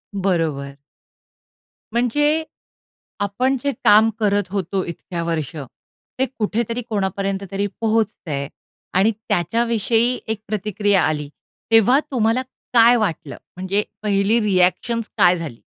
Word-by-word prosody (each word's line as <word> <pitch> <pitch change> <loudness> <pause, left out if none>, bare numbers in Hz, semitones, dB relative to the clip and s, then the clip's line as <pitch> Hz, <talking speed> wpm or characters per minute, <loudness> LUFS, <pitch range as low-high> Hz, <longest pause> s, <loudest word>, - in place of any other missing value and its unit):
बरोबर. 160 -8 -1 1.2
म्हणजे 295 +7 +2 0.8
आपण 245 +7 0
जे 280 - +1
काम 215 +2 +6
करत 205 -1 +2
होतो 190 -1 -2
इतक्या 170 0 -5
वर्ष, 165 -1 -3 0.6
ते 265 - +3
कुठेतरी 230 +2 -1
कोणापर्यंत 195 -1 -2
तरी 200 +1 -1
पोहोचतं 220 -6 0
आहे. 140 0 -2 0.5
आणि 195 +5 +4
त्याच्याविषयी 230 +4 +1
एक 220 -1 -3
प्रतिक्रिया 205 -1 +1
आली, 150 -2 -3 0.4
तेव्हा 225 +5 +6
तुम्हाला 230 0 +1 0.3
काय 235 +1 +7
वाटलं? 175 -9 -2 0.2
म्हणजे 190 +3 0 0.2
पहिली 205 +2 +2
रिॲक्शन्स 210 +3 +1
काय 180 -2 +5
झाली? 155 -9 -7
205 Hz, 110 wpm, -21 LUFS, 180-225 Hz, 1.2 s, काय